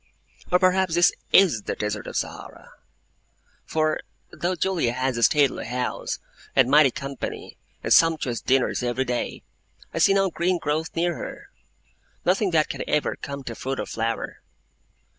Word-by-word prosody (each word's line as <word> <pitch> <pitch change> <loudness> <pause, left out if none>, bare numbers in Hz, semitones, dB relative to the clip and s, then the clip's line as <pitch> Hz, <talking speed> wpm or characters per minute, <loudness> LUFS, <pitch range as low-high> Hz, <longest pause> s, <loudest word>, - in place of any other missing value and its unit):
Or 180 - +6
perhaps 185 -1 +2
this 175 +1 +5 0.2
IS 180 - +5
the - - -4
Desert 105 -1 -3
of - - -7
Sahara! - - -6 0.9
For, 155 -1 0 0.3
though 180 +2 -2
Julia 175 -9 0
has 130 0 -1
a 115 - -2
stately 140 -2 +3
house, 125 +1 -3 0.4
and 130 -1 +4
mighty 145 -1 +7
company, 135 +1 -6 0.3
and - - +3
sumptuous 155 -8 +3
dinners 130 -1 +1
every 125 +2 -1
day, 125 -1 -3 0.5
I - - -2
see 195 - +5
no 195 -2 +2
green 175 +2 +1
growth 155 0 -1
near 175 +1 +1
her; - - -8 0.7
nothing 195 +2 +2
that 160 -3 +2
can - - -5
ever 150 - +1
come 140 -1 -7
to 120 - -5
fruit 135 +3 -4
or - - -2
flower. 115 +1 -3
150 Hz, 155 wpm, -24 LUFS, 125-175 Hz, 0.9 s, mighty